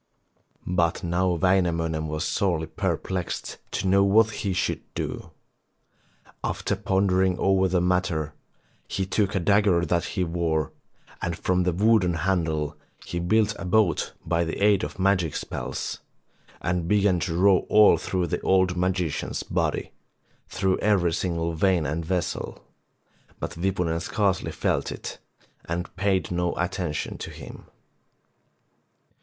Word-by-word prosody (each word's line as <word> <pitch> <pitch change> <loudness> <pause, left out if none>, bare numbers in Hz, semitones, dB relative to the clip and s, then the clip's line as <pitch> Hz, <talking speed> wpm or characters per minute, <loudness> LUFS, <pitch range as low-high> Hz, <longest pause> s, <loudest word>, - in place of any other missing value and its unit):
But 85 -2 0
now 90 +1 +1
Wainamoinen 85 -4 +1
was 75 +2 -2
sorely 85 -6 0
per 80 - -1
plexed 90 -3 -4
to - - -2
know 100 +1 +5
what 110 +3 +4
he 100 -2 -3
should 90 - -1
do. - - -4 1.1
After - - -1
pondering 95 -1 +1
over 95 -1 +3
the 90 -1 +1
matter, 90 -4 0 0.5
he 95 - -2
took 100 +1 0
a - - +2
dagger 100 -2 +3
that 85 +1 0
he 95 - +2
wore, 80 -3 -1 0.5
and 85 -1 -2
from 90 0 +1
the 90 0 +2
wooden 95 -1 +3
handle 80 -4 0 0.3
he 85 - -3
built 105 +4 +2
a 95 - -5
boat 90 -3 +2
by 85 0 +1
the 80 - -3
aid 105 -2 +4
of - - -5
magic 95 -4 +1
spells, - - -4 0.6
and 90 -1 -1
began 100 -2 +3
to 80 +1 -2
row 95 0 +4
all 105 0 +7
through 90 -2 -1
the 85 - -2
old 95 -1 +3
magician's 90 -3 -1
body, - - -1 0.6
through 95 -1 0
every 95 -5 +2
single 85 -1 -1
vein 90 -1 +2
and 75 +4 -2
vessel, 90 +1 -3 0.7
but - - -4
Wipunen 90 -2 0
scarcely 100 0 0
felt - - -1
it, - - -7 0.5
and 85 0 -4
paid 95 -3 0
no 90 0 0
attention 85 -3 -3
to - - -6
him. - - -10
90 Hz, 140 wpm, -25 LUFS, 85-95 Hz, 1.1 s, all